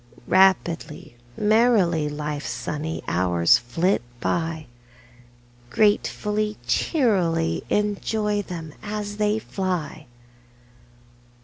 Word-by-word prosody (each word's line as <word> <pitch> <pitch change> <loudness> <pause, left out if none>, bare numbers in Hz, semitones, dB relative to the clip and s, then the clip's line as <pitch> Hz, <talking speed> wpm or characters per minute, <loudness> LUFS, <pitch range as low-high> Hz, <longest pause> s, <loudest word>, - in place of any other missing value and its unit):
Rapidly, 175 -4 +2 0.2
merrily, 210 -8 +3
Life's 150 0 -4
sunny 150 +7 -4
hours 85 -1 +3
flit 165 +11 0 0.2
by, 160 +3 -2 1.0
Gratefully, 210 0 +1
cheerily 180 - +1
Enjoy 210 0 0
them 165 -5 -7
as 205 -1 -5
they 210 0 +1
fly! 180 -8 -4
180 Hz, 75 wpm, -23 LUFS, 155-210 Hz, 1.0 s, merrily